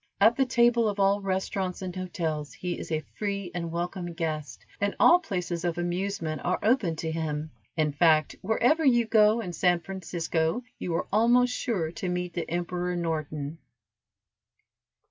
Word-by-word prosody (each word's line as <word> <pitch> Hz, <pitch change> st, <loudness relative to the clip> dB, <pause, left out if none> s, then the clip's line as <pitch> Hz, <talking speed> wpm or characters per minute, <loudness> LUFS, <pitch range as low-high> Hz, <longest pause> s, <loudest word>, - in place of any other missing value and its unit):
At 220 Hz, +4 st, +6 dB
the 270 Hz, -1 st, +2 dB
table 235 Hz, -2 st, +4 dB
of 205 Hz, 0 st, -4 dB
all 200 Hz, +1 st, +3 dB
restaurants 190 Hz, -1 st, -2 dB
and 180 Hz, -1 st, -5 dB
hotels 165 Hz, -5 st, -3 dB
he 180 Hz, -1 st, -4 dB
is -, -, -7 dB
a 155 Hz, -1 st, -1 dB
free 200 Hz, -3 st, -2 dB
and 170 Hz, -2 st, -3 dB
welcome 175 Hz, +1 st, -3 dB
guest, 155 Hz, -, -4 dB
and 200 Hz, 0 st, 0 dB
all 350 Hz, -, +7 dB
places 180 Hz, -, -3 dB
of 175 Hz, -1 st, -1 dB
amusement 175 Hz, -3 st, -2 dB
are 180 Hz, -, +1 dB
open 215 Hz, -7 st, +2 dB
to 160 Hz, 0 st, -3 dB
him; 155 Hz, -1 st, -3 dB, 0.3 s
in 155 Hz, -2 st, +2 dB
fact, 155 Hz, 0 st, +3 dB
wherever 245 Hz, -, +2 dB
you 240 Hz, -4 st, +4 dB
go 220 Hz, 0 st, +4 dB
in 180 Hz, -5 st, -5 dB
San 175 Hz, +1 st, +2 dB
Francisco, 170 Hz, +2 st, -2 dB, 0.2 s
you 170 Hz, -, -2 dB
are -, -, -1 dB
almost 245 Hz, +3 st, +4 dB
sure 185 Hz, -, -1 dB
to 180 Hz, +2 st, -4 dB
meet 180 Hz, -1 st, -2 dB
the 170 Hz, -, -4 dB
Emperor 175 Hz, +1 st, -2 dB
Norton. 155 Hz, -2 st, -3 dB
180 Hz, 165 wpm, -27 LUFS, 165-205 Hz, 0.3 s, all